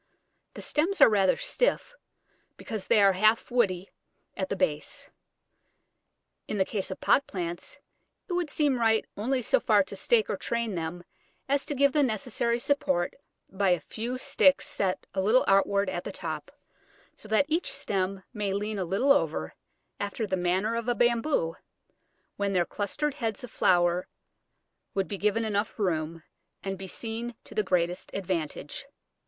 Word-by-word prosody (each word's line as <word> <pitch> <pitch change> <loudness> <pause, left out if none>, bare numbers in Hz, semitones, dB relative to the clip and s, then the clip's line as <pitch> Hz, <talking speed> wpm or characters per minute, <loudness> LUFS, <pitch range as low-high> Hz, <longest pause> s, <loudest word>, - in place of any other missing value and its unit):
The - - -7
stems 340 +6 0
are - - +9
rather 195 -3 +3
stiff, - - 0 0.6
because 220 -6 -5
they 210 - +5
are 195 -1 +6
half 215 +6 +3
woody 195 -7 +1 0.4
at 190 -1 -3
the - - -1
base. 160 -6 -2 1.4
In 210 - -2
the 190 - +3
case 200 -2 -3
of 190 - -6
pot 280 - +3
plants 175 -1 -5 0.5
it 360 - -3
would 350 -3 0
seem 285 -3 +1
right 225 -1 +3
only 250 +5 0
so - - +3
far - - +4
to - - -8
stake 465 -3 +2
or - - -2
train 235 -2 -2
them 170 0 -4 0.4
as 280 +1 +1
to 290 - -2
give 280 0 +4
the 300 - +4
necessary 235 -1 0
support 185 -10 0 0.4
by 195 0 +1
a 180 -1 +3
few 235 +10 -4
sticks 275 +1 +3
set 200 -11 -1
a 190 - 0
little 220 +7 +4
outwards 195 0 +3
at - - -3
the - - -5
top, - - -5 0.6
so - - -13
that 220 +6 +3
each 325 +3 0
stem 195 -1 -2
may 205 -3 -1
lean 210 +1 -2
a 185 - -1
little 200 +11 +2
over, 150 - +1 0.5
after 205 +2 -2
the 190 -2 -1
manner 185 +5 +1
of 235 0 -3
a 245 - +2
Bamboo, 235 - +1 0.8
when 200 -1 0
their 175 -2 +3
clustered 290 - -2
heads 225 -5 -3
of 245 - -8
flower 175 0 +3 0.9
would 195 -1 +1
be 200 - -4
given 210 +2 +1
enough 210 0 -1
room, 165 -5 -1 0.4
and 195 0 -2
be 190 0 -7
seen 230 +4 -4
to - - -12
the 215 - +2
greatest 180 -2 0
advantage. 175 -6 -3
205 Hz, 165 wpm, -28 LUFS, 185-240 Hz, 1.4 s, are